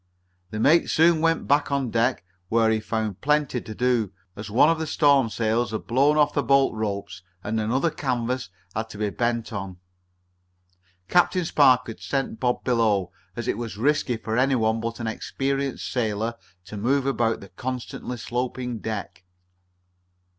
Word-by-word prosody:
The 110 - -5
mate 160 +9 +4
soon 165 0 +4
went 165 0 +1
back 145 +1 +2
on 135 -4 0
deck, 115 -3 +1 0.2
where 115 -1 +3
he 110 - +1
found 110 -2 -3
plenty 145 -3 +1
to 110 - -8
do, 120 -5 +1 0.2
as 105 0 -7
one 115 +8 +5
of 165 0 +2
the 160 - -2
storm 140 -6 +4
sails 110 +1 0
had 110 0 -4
blown 140 +5 +3
off 150 -1 +3
the 145 - +1
bolt 135 -2 +3
ropes 100 -4 -4 0.2
and 110 +2 -1
another 130 +9 +1
canvas 125 -2 -2 0.2
had 110 +1 -3
to 105 - -9
be 105 -1 -1
bent 115 0 -1
on. 95 -3 -5 1.3
Captain 180 - +3
Spark 130 -5 +4
had 115 - -8
sent 135 -5 -2
Bob 125 -1 0
below, 110 -7 +1 0.2
as 120 0 -4
it 110 - -1
was 115 -4 -5
risky 130 -1 +1
for 110 +1 -2
any 135 +1 +3
one 110 -1 +1
but 115 +1 -4
an 115 - -4
experienced 135 +4 -2
sailor 110 -1 -1 0.3
to 105 +2 -8
move 130 +6 +1
about 120 -4 +1
the 100 - -12
constantly 125 -1 -5
sloping 125 0 -3
deck. 105 -4 -5
120 Hz, 170 wpm, -25 LUFS, 110-135 Hz, 1.3 s, one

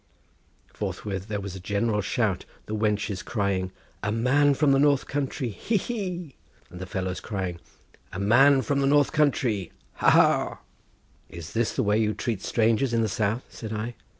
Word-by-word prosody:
Forthwith 95 -2 -4
there 105 -2 -2
was 100 -1 -6
a - - -6
general 105 +3 0
shout—the 105 0 -2
wenches 105 -2 -1
crying: 100 -4 -1 0.3
"A 110 - -1
man 135 +6 +3
from 145 0 +3
the 135 - +4
north 145 -1 +3
country, 135 -2 -2
hee, 210 - -1
hee!" 180 - -4 0.4
and 90 - -9
the 95 - -6
fellows 95 -1 -3
crying: 95 -5 -4 0.5
"A - - -6
man 130 +7 +5
from 140 -1 0
the 135 - +2
north 145 0 +4
country, 125 - +1 0.3
hoo, - - +1
hoo!" - - +4 0.7
"Is 85 -2 -9
this 115 0 0
the - - +1
way 105 +1 +2
you 110 -2 +1
treat 110 -2 -2
strangers 115 +2 +1
in 115 - +2
the - - +1
south?" 110 +4 -1
said 110 -2 -7
I. 110 +3 -3
110 Hz, 170 wpm, -26 LUFS, 100-135 Hz, 0.7 s, man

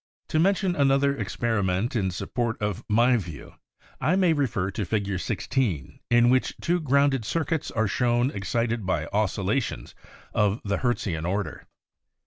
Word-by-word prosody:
To 155 - +1
mention 190 +1 +2
another 140 0 +3
experiment 110 -1 -1
in 100 -5 +1
sup 90 - -6
port 120 -2 -1
of 105 -3 -2
my 120 +4 +4
view, 85 -8 -8 0.5
I 175 - +2
may 185 -3 +4
refer 105 - -1
to 105 - -3
Fig. 100 -1 -1
16 100 - -2
in 120 0 +5
which 130 0 +1
two 175 +1 +1
grounded 140 -4 +2
circuits 160 +4 -1
are 110 -2 0
shown 120 +4 +1
excited 115 +2 -1
by 85 -5 0
oscillations 105 - -1 0.4
of 105 +1 +2
the 100 0 0
Hertzian 95 -10 -1
order. 100 +2 -3
115 Hz, 145 wpm, -26 LUFS, 100-135 Hz, 0.5 s, in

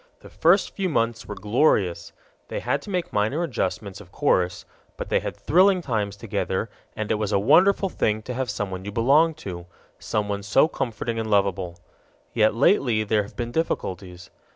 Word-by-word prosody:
The - - -14
first 175 +5 +3
few 190 -2 -1
months 115 -5 -1
were 105 - -6
glorious: 100 - +1 0.4
they - - -4
had - - -1
to - - -11
make 180 -3 -2
minor 110 +11 +1
adjustments, 100 - -3
of 90 -3 -16
course, 90 -11 0 0.3
but - - -6
they - - +2
had - - -6
thrilling 185 +1 +3
times 105 -6 -2
together, 100 - -3 0.2
and 110 -1 -3
it 105 - +1
was 105 -1 -1
a - - +3
wonderful 180 - +4
thing 110 - -1
to 125 - -5
have 130 0 -3
someone 95 -3 -4
you 100 - -6
belonged 145 +9 +3
to, 90 -2 -6 0.3
someone 105 -1 -2
so 105 +9 +3
comforting 115 -5 -3
and 110 -1 -3
lovable. 95 -4 0 0.6
Yet 110 0 +3
lately 120 - +3
there 105 0 +1
have 100 - -10
been 120 -1 -4
difficulties. 90 - -3
110 Hz, 175 wpm, -24 LUFS, 100-140 Hz, 0.6 s, wonderful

